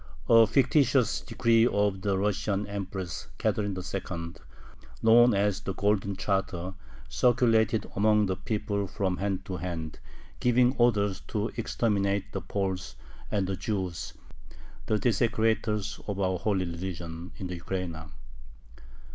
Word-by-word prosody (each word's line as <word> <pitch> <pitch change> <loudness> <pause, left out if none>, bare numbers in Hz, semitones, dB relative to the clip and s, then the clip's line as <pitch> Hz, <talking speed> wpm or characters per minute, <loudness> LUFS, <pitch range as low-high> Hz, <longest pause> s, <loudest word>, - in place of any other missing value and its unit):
A 115 -1 +7
fictitious 130 0 +3
decree 115 -1 +3
of 100 -3 +1
the 100 0 0
Russian 100 0 0
Empress 95 -4 -5
Catherine 100 -3 -1
II., 90 -2 -5 0.7
known 120 0 +6
as 100 0 +1
"the 95 - -4
golden 100 -1 +1
Charter," 95 -2 -2 0.3
circulated 115 -3 +2
among 105 +1 +4
the 95 -1 -1
people 105 -1 -2
from 95 -1 -1
hand 95 -1 -2
to 95 -2 -4
hand, 80 -4 -5 0.4
giving 125 +1 +3
orders 105 -5 +2
"to 105 +2 -1
exterminate 100 -4 0
the - - -3
Poles 95 -2 -3 0.3
and 100 -2 0
the 95 +1 -2
Jews, 95 -4 -3 0.7
the 110 - +2
desecrators 110 -1 0
of 100 -2 -3
our 95 -2 0
holy 95 -4 0
religion," 85 0 -6
in 95 - -6
the 90 -1 -4
Ukraina. 85 -3 -4
100 Hz, 125 wpm, -28 LUFS, 95-110 Hz, 0.7 s, A